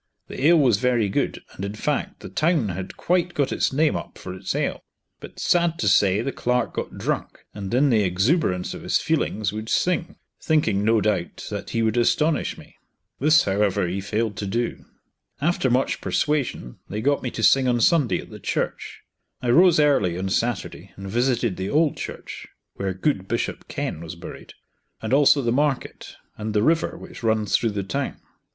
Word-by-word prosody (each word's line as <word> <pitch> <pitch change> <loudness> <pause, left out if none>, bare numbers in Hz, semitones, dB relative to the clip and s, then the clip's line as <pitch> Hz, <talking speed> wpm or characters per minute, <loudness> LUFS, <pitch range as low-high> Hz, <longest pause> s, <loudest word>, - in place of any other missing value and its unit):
The 140 - 0
ale 170 +1 +6
was 125 -9 +4
very 120 -2 +1
good, 95 - -1
and 95 - -8
in 100 +1 -4
fact 145 +6 -2
the - - -8
town 155 - +1
had 95 +1 -6
quite 175 0 0
got 140 -2 +1
its - - +1
name 150 +3 +2
up - - -6
for 90 - -7
its 95 +1 -4
ale. - - -1 0.4
But - - -11
sad 170 -1 +2
to 105 - -1
say 100 +2 +4
the 135 - -2
clerk 125 -1 -1
got - - -5
drunk, - - -3
and 100 -2 -6
in 135 +3 +3
the 110 -2 +4
exuberance 95 - +1
of - - -8
his - - +1
feelings 105 -1 -1
would 110 +1 -5
sing, 180 -1 0 0.3
thinking 110 -11 +1
no 110 0 +3
doubt 100 -4 -1
that - - -5
he 115 - 0
would 110 +1 +1
astonish 150 +6 +1
me. - - -15 0.4
This, 155 +3 +5
however, 100 -2 +1
he 95 +3 -3
failed 105 0 -2
to 100 - -3
do. 120 +4 -2 0.5
After 150 -2 +1
much 125 +2 +1
persuasion 140 - -1
they 105 +2 -3
got 140 +3 +1
me 125 - -2
to 115 - -5
sing 135 +2 +5
on 120 -1 +2
Sunday 145 +2 +3
at - - -9
the - - -9
church. - - -3 0.4
I 125 -2 0
rose 175 +3 +6
early 135 - +3
on 95 +1 -2
Saturday 120 +2 -2
and 95 0 -8
visited 120 -3 +1
the 95 +1 -3
old 155 0 +2
church - - -7 0.3
(where 95 -1 -3
good 95 -2 -1
Bishop - - -3
Kenn 80 - -4
was 85 0 -7
buried), 85 - -10 0.4
and 110 +3 -3
also 140 0 +5
the 120 - +1
market, 140 +1 -1 0.2
and 110 0 -4
the 105 - +3
river 165 +4 +1
which - - -11
runs 110 -3 +1
through 115 - +2
the 100 -1 -3
town. 135 +8 -3
115 Hz, 190 wpm, -23 LUFS, 100-145 Hz, 0.5 s, ale